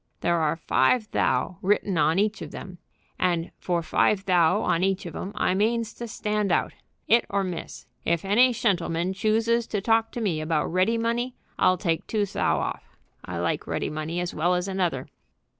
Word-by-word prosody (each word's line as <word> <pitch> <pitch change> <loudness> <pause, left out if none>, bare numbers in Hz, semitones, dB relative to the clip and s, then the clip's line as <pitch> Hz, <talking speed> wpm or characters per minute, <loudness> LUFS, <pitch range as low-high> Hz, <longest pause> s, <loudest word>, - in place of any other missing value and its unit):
"There 170 -1 +1
are 155 0 +1
five 210 - +1
thou' 185 - 0
written 200 0 +1
on 155 +3 +3
each 210 +1 +1
of - - -6
them, 180 -2 -9 0.4
and 175 -2 0
for 175 -2 -1
five 195 +4 +2
thou' 180 +2 +3
on 170 - +1
each 195 0 0
of 170 - -6
them 190 - -5
I 200 - +1
means 225 +3 0
to 235 - -7
stand 210 -2 -1
out. - - +1 0.3
'It 235 +1 +5
or 200 0 0
miss. 180 -3 -6 0.2
If 170 +2 0
any 240 +6 +5
shentleman 185 -6 0
chooses 225 +3 +1
to 210 - -1
talk 225 +2 +2
to - - -4
me 180 -9 -1
about 155 0 0
ready 190 +6 +2
money 235 +2 -1 0.2
I'll 185 - +4
take 165 -3 -1
two 210 -2 0
thou' 195 - 0
off. - - -5 0.3
I 90 - -5
like 85 0 -1
ready - - -2
money 155 +3 -3
as 175 0 -3
well 175 +4 +1
as 180 +1 -1
another." 180 -9 -1
190 Hz, 190 wpm, -25 LUFS, 170-215 Hz, 0.4 s, It